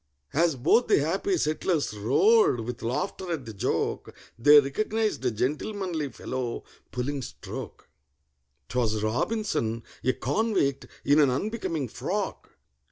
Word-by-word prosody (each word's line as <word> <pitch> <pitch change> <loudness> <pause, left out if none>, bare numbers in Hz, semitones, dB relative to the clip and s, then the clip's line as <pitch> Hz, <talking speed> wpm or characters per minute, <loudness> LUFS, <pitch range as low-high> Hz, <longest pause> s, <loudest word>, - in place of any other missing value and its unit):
As 165 0 +3
both 155 - +3
the - - +5
happy 195 - 0
settlers 155 - 0
roared 130 - +4
with 120 +1 -6
laughter 150 +9 -3
at 150 -6 -3
the 110 - -7
joke, 100 - -1 0.2
They 145 +6 +8
recognized 215 +8 -1
a - - +4
gentlemanly 155 - -2
fellow 130 -2 -4 0.3
pulling 135 +3 -2
stroke: - - -8 0.8
'Twas 110 -1 0
ROBINSON—a 115 - -1
convict, 200 - 0 0.2
in 145 +2 +5
an 145 -3 +5
unbecoming 165 - -2
frock! - - -4
145 Hz, 115 wpm, -27 LUFS, 125-190 Hz, 0.8 s, They